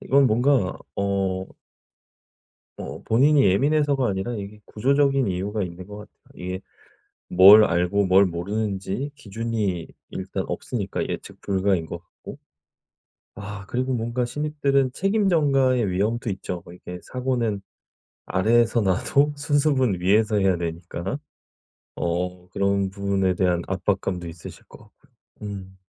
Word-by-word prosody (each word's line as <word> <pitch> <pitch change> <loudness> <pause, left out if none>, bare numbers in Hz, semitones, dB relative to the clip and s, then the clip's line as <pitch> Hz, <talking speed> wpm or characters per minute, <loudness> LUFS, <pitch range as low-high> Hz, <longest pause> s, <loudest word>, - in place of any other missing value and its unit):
이건 140 0 +4
뭔가 120 -3 +2 0.2
어 95 -1 -1 1.3
어 - - -7
본인이 140 +5 +4
예민해서가 140 +6 +2
아니라 100 +5 -2
이게 105 0 -7
구조적인 135 +1 +2
이유가 100 +3 -2
있는 90 0 -7
것 105 0 -9
같아요. 105 0 -12 0.3
이게 90 +1 -4 0.7
뭘 100 +4 +9
알고 90 +2 +2
뭘 95 +2 +6
모르는지 100 +7 -3
기준이 110 - -3 0.2
일단 95 0 -4
없으니까 105 -6 -3
예측 - - -6
불가인 95 -3 0
것 85 +1 -7
같고 - - -12 1.0
아 100 -1 -7
그리고 130 +4 -1
뭔가 120 +1 -1
신입들은 140 -1 0
책임 195 +4 +1
전가의 135 - +3
위험도 110 +6 -1
있죠. 95 -2 -4
뭐 85 - -12
이렇게 90 0 -9
사고는 120 -6 -2 0.6
아래에서 115 +4 +2
나도 140 +10 +2
수습은 140 - +1
위에서 105 +4 +3
해야 95 -2 +3
되니까. 85 - -4 0.8
어 90 +1 -3
그런 100 0 0
부분에 100 -1 0
대한 90 -1 +1
압박감도 95 -2 -2
있으실 80 0 -11
것 - - -14
같고요. - - -23 0.4
음. 95 -1 -8
100 Hz, 285 characters per minute, -24 LUFS, 95-125 Hz, 1.3 s, 뭘